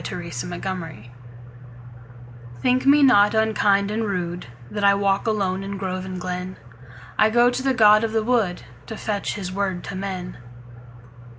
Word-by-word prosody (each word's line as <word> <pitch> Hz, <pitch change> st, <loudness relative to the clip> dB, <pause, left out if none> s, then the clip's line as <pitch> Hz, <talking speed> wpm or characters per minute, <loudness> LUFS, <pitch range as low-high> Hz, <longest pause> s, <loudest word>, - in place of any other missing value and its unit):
The 170 Hz, -2 st, -6 dB, 0.2 s
Apology 165 Hz, -, -6 dB, 1.5 s
THINK 255 Hz, +1 st, +2 dB
me 285 Hz, +1 st, +6 dB
not 210 Hz, -5 st, +5 dB
unkind 210 Hz, -2 st, +2 dB
and 220 Hz, +2 st, -2 dB
rudeThat 175 Hz, -, -5 dB
I 200 Hz, 0 st, +5 dB
walk 200 Hz, +1 st, 0 dB
alone 195 Hz, -3 st, 0 dB
in 195 Hz, 0 st, -5 dB
grove 185 Hz, -1 st, -4 dB
and 185 Hz, -1 st, -6 dB
glen;I 155 Hz, -, -4 dB
go 240 Hz, +2 st, +4 dB
to 250 Hz, +1 st, -3 dB
the 265 Hz, -1 st, 0 dB
god 215 Hz, -2 st, +6 dB
of 225 Hz, -, -1 dB
the 220 Hz, 0 st, 0 dB
woodTo 180 Hz, -, -2 dB
fetch 205 Hz, -2 st, -3 dB
his 190 Hz, -3 st, -5 dB
word 190 Hz, -2 st, -2 dB
to 195 Hz, -, -7 dB
men. 185 Hz, -4 st, -5 dB
195 Hz, 140 wpm, -22 LUFS, 180-215 Hz, 1.5 s, me